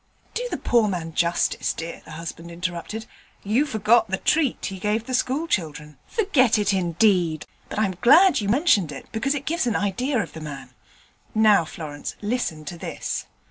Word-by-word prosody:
'Do -, -, -2 dB
the -, -, -3 dB
poor 235 Hz, -3 st, +2 dB
man 170 Hz, -4 st, -3 dB
justice, 170 Hz, +1 st, +1 dB
dear,' 165 Hz, +1 st, -7 dB
the 160 Hz, -, -10 dB
husband 165 Hz, +1 st, -7 dB
interrupted. 180 Hz, +5 st, -5 dB, 0.4 s
'You 235 Hz, +9 st, +2 dB
forget 220 Hz, -1 st, +3 dB
the 190 Hz, 0 st, -1 dB
treat 300 Hz, +1 st, +1 dB
he 190 Hz, -1 st, -5 dB
gave 215 Hz, +3 st, -1 dB
the 255 Hz, -, -5 dB
school 265 Hz, +5 st, 0 dB
children.' 150 Hz, -, -3 dB
'Forget 285 Hz, -, +3 dB
it, 205 Hz, -1 st, +1 dB
indeed! 175 Hz, -3 st, +2 dB, 0.2 s
But -, -, -6 dB
I'm 200 Hz, -4 st, +1 dB
glad 300 Hz, -, +6 dB
you 200 Hz, -, -2 dB
mentioned 215 Hz, -, +3 dB
it, 135 Hz, -, -8 dB
because 275 Hz, +6 st, 0 dB
it 280 Hz, -1 st, -5 dB
gives 325 Hz, -5 st, 0 dB
an 230 Hz, -, 0 dB
idea 245 Hz, +7 st, 0 dB
of 180 Hz, -9 st, -2 dB
the 160 Hz, -, -8 dB
man. 145 Hz, -3 st, -8 dB, 0.6 s
Now, 215 Hz, -5 st, +5 dB
Florence, 150 Hz, -2 st, -7 dB
listen 205 Hz, -9 st, -2 dB
to 170 Hz, +3 st, -7 dB
this. -, -, -4 dB
205 Hz, 180 wpm, -24 LUFS, 170-245 Hz, 0.6 s, glad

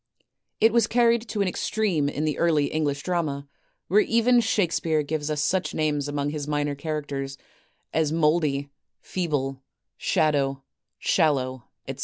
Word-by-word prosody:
It 225 Hz, 0 st, +5 dB
was 235 Hz, -2 st, +4 dB
carried 235 Hz, 0 st, +3 dB
to 210 Hz, -, -1 dB
an -, -, -1 dB
extreme 185 Hz, -6 st, 0 dB
in 150 Hz, +2 st, -2 dB
the 155 Hz, -, -1 dB
early 155 Hz, -4 st, +2 dB
English 145 Hz, -2 st, -1 dB
drama, 155 Hz, -6 st, -2 dB, 0.4 s
whei:e 210 Hz, +4 st, +4 dB
even 240 Hz, +1 st, +4 dB
Shakespeare 170 Hz, -8 st, +1 dB
gives 150 Hz, 0 st, -3 dB
us 150 Hz, -1 st, 0 dB
such 185 Hz, +2 st, 0 dB
names 150 Hz, -2 st, 0 dB
among 145 Hz, 0 st, -2 dB
his 150 Hz, -1 st, -4 dB
minor 145 Hz, -1 st, 0 dB
characters 140 Hz, -2 st, -4 dB, 0.6 s
as 155 Hz, -2 st, +1 dB
Mouldy, 150 Hz, -3 st, +1 dB, 0.3 s
Feeble, 140 Hz, -7 st, -2 dB, 0.4 s
Shadow, 140 Hz, -5 st, +1 dB, 0.3 s
Shallow, 130 Hz, -, +1 dB, 0.2 s
etc. -, -, -6 dB
155 Hz, 140 wpm, -25 LUFS, 145-180 Hz, 0.6 s, It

